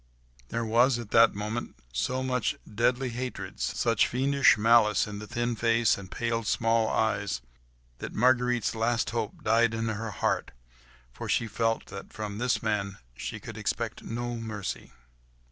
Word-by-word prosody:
There 115 0 -2
was 120 +3 +4
at 115 -3 -7
that 115 -2 +6
moment 105 +3 -4 0.2
so 125 - -1
much 125 -2 0
deadly 125 +4 +1
hatred, 115 -5 -5
such 115 -3 +2
fiendish 140 +1 +4
malice 110 -1 +4
in 105 -1 -6
the 105 - -8
thin 120 +2 -1
face 115 0 +3
and 95 -2 -9
pale, 115 +1 -1
small 115 +1 +2
eyes, 100 - 0 0.6
that - - -5
Marguerite's 125 -2 +2
last 115 +1 0
hope 115 -2 -4
died 115 0 +3
in 115 0 -1
her 110 +1 -3
heart, 100 - -1 0.6
for - - -7
she 115 - +2
felt 115 +1 -1
that 100 - -8
from 105 -1 -5
this 125 0 0
man 100 -3 -1 0.2
she - - -5
could - - -8
expect - - -2
no 120 +1 -4
mercy. 110 -3 -5
115 Hz, 155 wpm, -28 LUFS, 105-120 Hz, 0.6 s, that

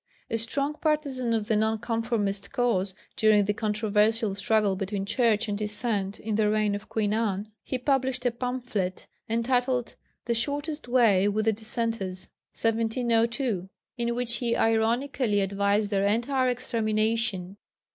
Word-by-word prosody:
A 230 - +1
strong 275 +6 -1
partisan 285 -6 0
of 220 -2 0
the 220 - +2
Nonconformist 220 -2 -1
cause 205 -7 0 0.2
during 215 -2 +4
the 210 - +1
controversial 215 0 +1
struggle 205 0 +2
between 195 0 -3
Church 225 0 +2
and 205 - -1
Dissent 210 -1 -1
in 220 0 -3
the 210 0 +2
reign 215 -1 +1
of 205 - -6
Queen 210 -2 0
Anne, 215 -2 -1
he 260 - -3
published 260 -1 0
a 245 - +3
pamphlet 240 -6 -3 0.2
entitled 245 +2 0 0.3
The 235 - +1
Shortest 290 +5 -2
Way 225 -6 +4
with 215 +1 0
the 220 - +3
Dissenters 220 -4 -2 0.2
(1702), 230 -2 0 0.3
in 235 -1 -1
which 240 -1 -1
he 235 -2 0
ironically 225 0 +1
advised 200 +2 +1
their 200 0 +2
entire 255 +5 +1
extermination. 220 -5 -1
225 Hz, 135 wpm, -27 LUFS, 205-245 Hz, 0.3 s, during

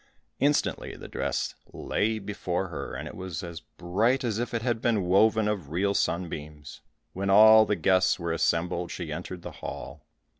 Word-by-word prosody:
Instantly 145 +1 0
the - - -10
dress - - -2 0.2
lay 110 +1 -1
before 95 -3 -3
her, 80 - -6
and - - -5
it - - -8
was 90 -4 -6
as 85 -2 -6
bright 110 +13 0
as 115 -3 -1
if 120 - -2
it 115 -2 -2
had 120 -2 0
been 115 -5 +1
woven 105 +4 +3
of 100 -9 -2
real 95 +5 0
sunbeams. 75 -5 -3 0.3
When 100 +1 -2
all 110 +2 +8
the 105 - +1
guests 95 -1 +3
were 85 -2 -3
assembled, 85 +1 0
she 85 -4 -5
entered 90 +1 -7
the - - -6
hall. 75 +1 -7
95 Hz, 175 wpm, -27 LUFS, 85-110 Hz, 0.3 s, all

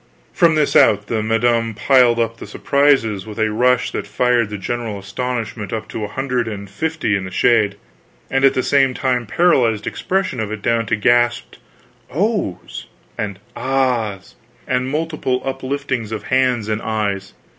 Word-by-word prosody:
From 170 -3 +4
this 150 -2 +1
out, 105 -1 +5
the 110 0 -1
madam 115 0 +1
piled 125 0 +4
up 115 0 -1
the - - -9
surprises 135 -8 +1
with 105 - -8
a 110 -1 +1
rush 125 +3 +2
that - - -4
fired 125 -3 +1
the 105 - -5
general 115 +1 -4
astonishment 110 0 -4
up 110 -1 -4
to 110 - -5
a - - -2
hundred 125 +1 -2
and 100 -2 -6
fifty 155 +2 -1
in 100 - -2
the 95 - -6
shade, 105 0 +2 0.5
and 135 0 0
at 135 - +5
the 130 - +1
same 135 -1 +2
time 125 -4 0
paralyzed 120 -8 +2
expression 185 -9 -2
of 110 -1 -3
it 110 -1 -6
down 115 -1 +1
to - - +1
gasped 120 +2 +1 0.5
"Oh's" 195 - -2 0.3
and 100 -3 -4 0.2
"Ah's," 125 -8 -1 0.3
and 130 +1 -1
mute 160 +2 -1
upliftings 130 -3 -3
of 110 -2 -4
hands 130 -4 +2
and 110 0 -1
eyes. 100 -3 -2
120 Hz, 165 wpm, -19 LUFS, 105-130 Hz, 0.5 s, out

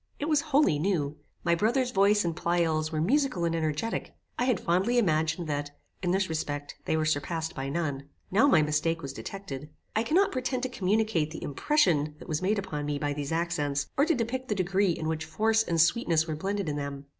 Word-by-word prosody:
It 290 - -3
was 305 -2 +3
wholly 280 - +4
new. 155 -5 0 0.3
My 170 - +3
brother's 240 +8 +1
voice 200 0 +3
and 170 -1 -1
Pleyel's 160 -2 0
were 155 - -1
musical 235 - +1
and 165 0 0
energetic. 155 +6 -2 0.2
I 245 - +2
had 250 -6 +2
fondly 190 +8 +1
imagined, 160 -4 +1
that, 145 -1 -3 0.2
in 180 - -1
this 190 +1 +2
respect, 145 -2 -3
they 160 - +1
were 155 - +1
surpassed 160 +2 -1
by 135 0 -4
none. 145 -3 -3 0.2
Now 220 +9 +5
my 155 - +5
mistake 155 +2 0
was 135 -1 -5
detected. 150 -4 -7 0.3
I 220 - +3
cannot 350 - +3
pretend 255 0 -2
to 260 - -1
communicate 210 -7 +1
the 160 - -8
impression 155 - +1
that - - -12
was 155 -2 -1
made 205 +4 +1
upon 155 -7 -3
me 145 -1 -1
by 145 0 -1
these 145 0 -4
accents, 160 -4 -1
or 285 +3 +3
to 330 - +3
depict 255 +2 -2
the 210 - 0
degree 195 +1 +1
in 155 - -4
which 160 0 -2
force 220 +8 +2
and 170 -6 -1
sweetness 165 -2 +3
were 160 -2 -3
blended 195 +3 -2
in 145 -1 -2
them. 140 -1 -5
170 Hz, 210 wpm, -28 LUFS, 150-215 Hz, 0.3 s, Now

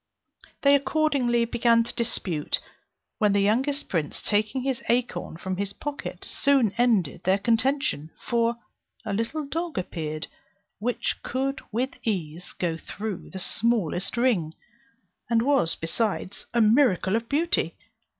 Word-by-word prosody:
They 280 0 +6
accordingly 275 -4 +2
began 230 0 +3
to 230 - -7
dispute; 185 -9 -1 0.6
when 210 -3 +4
the 200 - +3
youngest 260 +8 +1
prince, 160 -5 -1
taking 215 +5 0
his 265 -2 -1
acorn 240 -8 0
from 185 +1 -3
his 200 0 -2
pocket, 290 +5 -6
soon 270 -8 +3
ended 215 - +2
their 190 +1 +3
contention; 230 - +1
for 235 0 +1 0.5
a 205 - -2
little 230 +9 -2
dog 330 +2 -3
appeared 155 -4 -3 0.5
which 240 +3 -1
could 270 +2 -2
with 250 +5 0
ease 175 -5 -3
go 165 -2 -1
through 205 +3 -6
the 190 - -7
smallest 195 -1 0
ring, 205 -11 +2 0.7
and 230 -1 +3
was 265 - +3
besides 195 +3 -2
a 235 - +3
miracle 215 -4 +4
of 230 0 -2
beauty. 325 +4 +1
230 Hz, 130 wpm, -26 LUFS, 190-260 Hz, 0.7 s, They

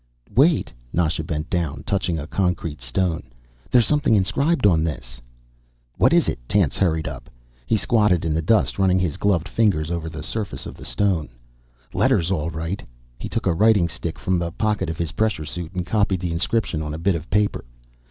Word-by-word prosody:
"Wait." 150 +6 +3 0.2
Nasha 80 -1 0
bent 75 0 -3
down, 85 -4 -2
touching 95 -4 -1
a 75 - -4
concrete 85 -5 -2
stone. 80 +7 -1 0.5
"There's 120 -3 +5
something 145 -3 +2
inscribed 135 - +1
on 85 -6 +4
this." 60 -6 -5 0.7
"What - - +4
is - - +4
it?" - - -2
Tance 100 -9 +2
hurried 80 -5 +1
up. 65 -4 -7 0.4
He 110 - +3
squatted 105 -6 +2
in 80 - 0
the 80 - +1
dust, 105 +4 +2
running 95 -1 +4
his 90 -5 -1
gloved 95 -5 +1
fingers 85 -8 +1
over 85 -2 -3
the 75 -1 -7
surface 105 +4 -3
of - - -7
the - - -11
stone. 95 -7 0 0.6
"Letters, 85 +2 +2
all 85 -3 0
right." 80 +4 -4 0.4
He - - -5
took - - -2
a - - +3
writing 100 0 +4
stick 85 0 -5
from 90 -1 0
the 85 -1 -2
pocket 105 -2 -1
of 80 - -4
his 85 -2 -2
pressure 105 -5 0
suit 85 +1 -5
and 90 -1 -2
copied 95 -1 +1
the 90 -2 -2
inscription 85 0 0
on 75 -1 -4
a 80 +2 -8
bit 100 - +4
of 85 -1 -5
paper. 105 +1 +1
85 Hz, 190 wpm, -22 LUFS, 80-100 Hz, 0.7 s, There's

